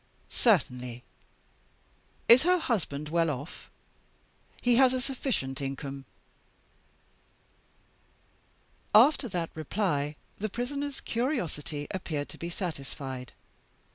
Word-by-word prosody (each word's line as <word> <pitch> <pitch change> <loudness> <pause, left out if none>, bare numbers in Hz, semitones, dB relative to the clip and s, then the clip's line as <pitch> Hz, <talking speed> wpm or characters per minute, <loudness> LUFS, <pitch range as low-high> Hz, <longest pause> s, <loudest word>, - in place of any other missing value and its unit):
"'Certainly!' 125 - +1 1.2
"'Is 235 +2 +9
her 360 +2 +4
husband 155 - -2
well 165 0 +2
off?' 145 +3 -6 0.9
"'He 245 -1 +3
has 260 -1 +6
a 255 - +1
sufficient 250 - -2
income.' 135 0 -5 2.9
"After 255 +4 +6
that 175 -3 -2
reply, 155 -3 -1 0.2
the 215 +2 -1
Prisoner's 280 +5 -3
curiosity 175 - -2
appeared 155 -6 -3
to - - -10
be 170 - -4
satisfied. 135 - -5
170 Hz, 90 wpm, -29 LUFS, -, 2.9 s, Is